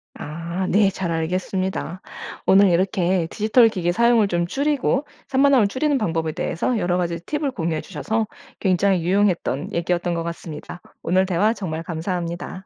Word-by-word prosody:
아 170 Hz, +4 st, -4 dB
네 200 Hz, 0 st, +4 dB
잘 185 Hz, -3 st, -3 dB
알겠습니다. 185 Hz, +2 st, -2 dB, 0.4 s
오늘 195 Hz, +1 st, +6 dB
이렇게 180 Hz, -1 st, +1 dB
디지털 220 Hz, +2 st, +4 dB
기기 180 Hz, -5 st, -1 dB
사용을 235 Hz, +1 st, +4 dB
좀 175 Hz, -2 st, 0 dB
줄이고 280 Hz, +3 st, 0 dB, 0.2 s
산만함을 270 Hz, -4 st, +4 dB
줄이는 285 Hz, +6 st, 0 dB
방법에 165 Hz, -8 st, -1 dB
대해서 200 Hz, +12 st, -1 dB
여러 175 Hz, -3 st, 0 dB
가지 170 Hz, -1 st, -1 dB
팁을 295 Hz, -2 st, -1 dB
공유해 165 Hz, -8 st, -2 dB
주셔서 215 Hz, +6 st, -2 dB, 0.3 s
굉장히 190 Hz, -1 st, +2 dB
유용했던 180 Hz, -6 st, +1 dB
얘기였던 175 Hz, +1 st, 0 dB
것 165 Hz, -, -2 dB
같습니다. 170 Hz, 0 st, -7 dB, 0.2 s
오늘 185 Hz, +3 st, +2 dB
대화 195 Hz, +4 st, +2 dB
정말 165 Hz, -7 st, -4 dB
감사합니다. 175 Hz, +2 st, -4 dB
185 Hz, 365 characters per minute, -22 LUFS, 170-215 Hz, 0.4 s, 오늘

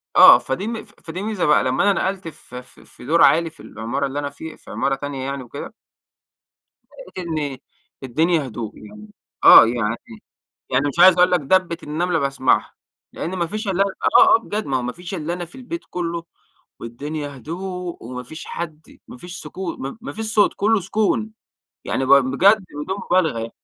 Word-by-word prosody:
آه، -, -, +10 dB
فدي 215 Hz, -, -4 dB
فدي 170 Hz, +3 st, -9 dB
ميزة 210 Hz, -4 st, -1 dB
بقى 150 Hz, -, +4 dB
لمّا 130 Hz, 0 st, +1 dB
أنا 195 Hz, -, 0 dB
نقلت 190 Hz, -2 st, -3 dB
ف 150 Hz, -5 st, -12 dB
ف 125 Hz, +1 st, -11 dB
في -, -, -16 dB
دور 165 Hz, +5 st, +2 dB
عالي 165 Hz, +1 st, +4 dB
في 160 Hz, -, -24 dB
العمارة 115 Hz, +6 st, -4 dB
اللي 140 Hz, +2 st, -4 dB
أنا 145 Hz, -1 st, -3 dB
في 160 Hz, +2 st, -10 dB
في -, -, -14 dB
عمارة 135 Hz, -, 0 dB
تانية 135 Hz, -1 st, -5 dB
يعني 140 Hz, -1 st, -4 dB
وكده 140 Hz, -, -9 dB, 1.3 s
لقيت 180 Hz, -2 st, -7 dB
إن 150 Hz, -5 st, -3 dB, 0.5 s
الدنيا 155 Hz, +3 st, +1 dB
هدوء. 110 Hz, -2 st, -7 dB
يعني 105 Hz, 0 st, -12 dB, 0.4 s
آه، -, -, +11 dB
يعني 115 Hz, -1 st, -1 dB, 0.7 s
يعني 135 Hz, +3 st, +1 dB
مش 155 Hz, -, -7 dB
عايز 185 Hz, 0 st, +8 dB
أقول 180 Hz, 0 st, +5 dB
لك 180 Hz, -, +3 dB
دَبِّة 170 Hz, +3 st, +1 dB
النملة 165 Hz, +3 st, -1 dB
باسعمها، 135 Hz, -2 st, +1 dB, 0.4 s
لأن 180 Hz, +4 st, -4 dB
ما 170 Hz, -2 st, -1 dB
فيش 215 Hz, +4 st, -5 dB
إلا 195 Hz, 0 st, +2 dB
آه، 360 Hz, -, +4 dB
آه -, -, +2 dB
بجد 210 Hz, +1 st, -4 dB
ما 135 Hz, -1 st, 0 dB
هو -, -, -2 dB
ما 125 Hz, 0 st, -3 dB
فيش 175 Hz, +2 st, -9 dB
إلاّ 165 Hz, 0 st, -3 dB
أنا 175 Hz, 0 st, -5 dB
في 170 Hz, -, -17 dB
البيت 265 Hz, +6 st, -6 dB
كله، 170 Hz, -1 st, -3 dB, 0.6 s
والدنيا 145 Hz, +5 st, -6 dB
هدوء 180 Hz, +4 st, -6 dB
وما 125 Hz, +2 st, -7 dB
فيش 155 Hz, +6 st, -10 dB
حد، 160 Hz, -2 st, -8 dB
ما -, -, -11 dB
فيش 175 Hz, +7 st, -9 dB
سكو 185 Hz, -3 st, -6 dB
م 135 Hz, +7 st, -6 dB
ما 250 Hz, -, -7 dB
فيش 220 Hz, +1 st, -5 dB
صوت، 210 Hz, -, +4 dB
كله 220 Hz, +1 st, +2 dB
سكون. 215 Hz, +3 st, 0 dB, 0.5 s
يعني 135 Hz, -, -1 dB
باق 140 Hz, +1 st, +7 dB
بجد 185 Hz, +11 st, +3 dB
بدون 165 Hz, +7 st, -4 dB
مبالغة 175 Hz, -10 st, +1 dB
يع 115 Hz, 0 st, -4 dB
160 Hz, 190 wpm, -21 LUFS, 135-185 Hz, 1.3 s, آه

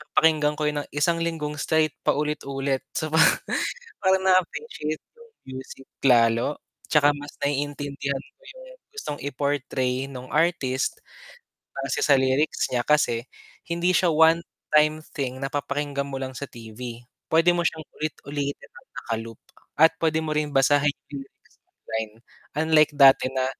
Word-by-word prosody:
papakinggan 150 Hz, -2 st, +4 dB
ko 155 Hz, -, -3 dB
'yon 150 Hz, 0 st, 0 dB
ng -, -, -16 dB
isang 165 Hz, +3 st, +2 dB
linggong 155 Hz, -3 st, -3 dB
straight 155 Hz, 0 st, +2 dB
paulit-ulit, 140 Hz, -2 st, -1 dB, 0.2 s
so 155 Hz, -2 st, -2 dB
parang 160 Hz, +1 st, +4 dB, 0.6 s
parang 190 Hz, -1 st, +2 dB
na-aapreciate 185 Hz, -, 0 dB
ko -, -, -24 dB
'yung 470 Hz, -1 st, -18 dB, 0.3 s
music 130 Hz, 0 st, -12 dB, 0.2 s
lalo 120 Hz, +2 st, +4 dB, 0.3 s
'tsaka 145 Hz, -1 st, +5 dB
mas 145 Hz, 0 st, -9 dB
naiintindihan 140 Hz, -1 st, -2 dB, 0.2 s
ko -, -, -36 dB
'yung -, -, -12 dB, 0.3 s
gustong 280 Hz, -, -5 dB
i-portray 135 Hz, -2 st, -1 dB
nung 130 Hz, -2 st, -9 dB
artist 150 Hz, -5 st, +1 dB, 0.9 s
base 135 Hz, -, -2 dB
sa 140 Hz, -2 st, +5 dB
lyrics 130 Hz, +3 st, +1 dB
niya 120 Hz, -, +2 dB
kasi 125 Hz, -5 st, +2 dB, 0.4 s
hindi 170 Hz, +2 st, +1 dB
siya 180 Hz, -1 st, +3 dB
one-time 155 Hz, -1 st, +3 dB, 0.2 s
thing 130 Hz, -3 st, -3 dB
na 135 Hz, -, -2 dB
papakinggan 140 Hz, 0 st, -2 dB
mo 135 Hz, -, -4 dB
lang 130 Hz, 0 st, -5 dB
sa 140 Hz, +1 st, -6 dB
TV, 115 Hz, +1 st, -9 dB, 0.2 s
puwede 165 Hz, +2 st, +4 dB
mo 175 Hz, -, 0 dB
siyang 160 Hz, -1 st, -1 dB, 0.2 s
ulit-ulitin 145 Hz, -2 st, -4 dB
ng 485 Hz, +1 st, -16 dB
naka-loop 115 Hz, 0 st, -5 dB, 0.4 s
at 160 Hz, +2 st, +6 dB
puwede 160 Hz, -1 st, +2 dB
mo 155 Hz, -, -1 dB
rin 150 Hz, -1 st, 0 dB
basahin 145 Hz, +1 st, +3 dB, 0.2 s
'yung 140 Hz, -, -4 dB
lyrics -, -, -31 dB, 0.2 s
online, 110 Hz, -1 st, -5 dB, 0.4 s
unlike 155 Hz, -1 st, +4 dB
dati 135 Hz, -2 st, +7 dB
na 130 Hz, 0 st, -1 dB
145 Hz, 145 wpm, -25 LUFS, 135-160 Hz, 0.9 s, dati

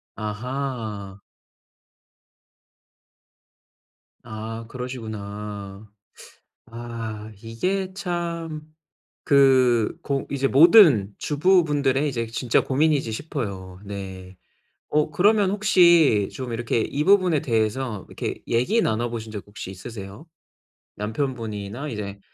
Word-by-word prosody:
아하. 110 Hz, -3 st, -5 dB, 3.0 s
아 115 Hz, 0 st, -7 dB
그러시구나. 105 Hz, -5 st, -7 dB, 0.8 s
아, 115 Hz, -2 st, -7 dB
이게 185 Hz, +12 st, -2 dB
참 170 Hz, -4 st, -4 dB, 0.6 s
그 130 Hz, -5 st, +4 dB
고 140 Hz, -4 st, -2 dB
이제 135 Hz, -1 st, +1 dB
모든 145 Hz, -, +6 dB
주부분들의 150 Hz, -4 st, +2 dB
이제 115 Hz, -4 st, -2 dB
진짜 115 Hz, +1 st, +1 dB
고민이지 140 Hz, -3 st, +1 dB
싶어요. 100 Hz, -, -5 dB
네. 95 Hz, -2 st, -8 dB, 0.6 s
어 150 Hz, 0 st, +2 dB
그러면 200 Hz, +5 st, +3 dB
혹시 170 Hz, -, +4 dB
좀 130 Hz, -2 st, -5 dB
이렇게 115 Hz, 0 st, -1 dB
이 145 Hz, -, -2 dB
부분에 185 Hz, -5 st, +4 dB
대해서 110 Hz, -2 st, -1 dB
이렇게 -, -, -5 dB
얘기 180 Hz, -, +2 dB
나눠보신 115 Hz, -, -2 dB
적 105 Hz, -2 st, -5 dB
혹시 100 Hz, -2 st, -8 dB
있으세요? 100 Hz, -, -9 dB, 0.7 s
남편분이나 110 Hz, +1 st, -4 dB
이제 100 Hz, -4 st, -6 dB
120 Hz, 200 characters per minute, -24 LUFS, 105-150 Hz, 3.0 s, 모든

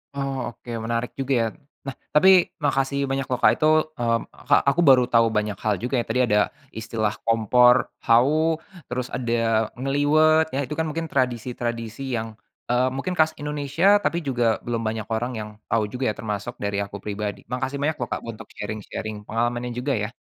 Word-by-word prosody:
Oh 135 Hz, -3 st, -3 dB
oke 120 Hz, +1 st, -16 dB, 0.2 s
menarik 115 Hz, +1 st, -2 dB
juga 135 Hz, 0 st, 0 dB
ya, 115 Hz, -, +2 dB, 0.4 s
nah 135 Hz, -, -4 dB, 0.2 s
tapi 185 Hz, +5 st, +7 dB, 0.4 s
makasih 140 Hz, 0 st, +1 dB
banyak 135 Hz, +1 st, 0 dB
loh 125 Hz, -, 0 dB
Kak -, -, +5 dB
itu, 155 Hz, -, 0 dB, 0.3 s
mmm, 115 Hz, -3 st, +1 dB, 0.3 s
Kak -, -, +6 dB
aku 145 Hz, +5 st, +2 dB
baru 130 Hz, -2 st, +7 dB
tahu 115 Hz, -1 st, +5 dB
banyak 105 Hz, -1 st, -1 dB
hal 105 Hz, -1 st, +2 dB
juga 125 Hz, +4 st, -2 dB
ya -, -, 0 dB
tadi 125 Hz, +3 st, +1 dB
ada 105 Hz, -1 st, +3 dB, 0.4 s
istilah 110 Hz, -2 st, -1 dB
kompor 120 Hz, +2 st, +5 dB, 0.3 s
hawu 155 Hz, +7 st, +3 dB, 0.3 s
terus 125 Hz, 0 st, -2 dB
ada 120 Hz, -2 st, -3 dB, 0.5 s
ngeliwet 155 Hz, +4 st, +3 dB
ya 135 Hz, -, 0 dB
itu 150 Hz, -, -4 dB
kan 160 Hz, -, 0 dB
mungkin 165 Hz, +1 st, -3 dB
tradisi-tradisi 120 Hz, -3 st, -2 dB
yang, 115 Hz, -1 st, -2 dB, 0.4 s
eee, 125 Hz, +1 st, +2 dB
mungkin 180 Hz, +7 st, -3 dB
khas 155 Hz, -2 st, +3 dB
Indonesia 145 Hz, +3 st, -2 dB, 0.2 s
tapi 170 Hz, -, 0 dB
juga 120 Hz, -3 st, 0 dB, 0.2 s
belum 115 Hz, -1 st, -2 dB
banyak 110 Hz, 0 st, -3 dB
orang 120 Hz, +3 st, -2 dB
yang 105 Hz, 0 st, -6 dB, 0.2 s
tahu 115 Hz, -2 st, +3 dB
juga 125 Hz, +3 st, -4 dB
ya -, -, -6 dB
termasuk 105 Hz, +2 st, -4 dB
dari 100 Hz, 0 st, -2 dB
aku 100 Hz, 0 st, -8 dB
pribadi 105 Hz, 0 st, -4 dB
makasih 130 Hz, +3 st, -3 dB
banyak 145 Hz, +2 st, 0 dB
loh 120 Hz, -, -4 dB
Kak -, -, -1 dB
untuk 110 Hz, -1 st, -8 dB
sharing-sharing 105 Hz, 0 st, -6 dB
pengalamannya 120 Hz, +3 st, -2 dB
juga 135 Hz, +3 st, -1 dB
ya. 105 Hz, +1 st, -2 dB
125 Hz, 180 wpm, -24 LUFS, 115-140 Hz, 0.5 s, tapi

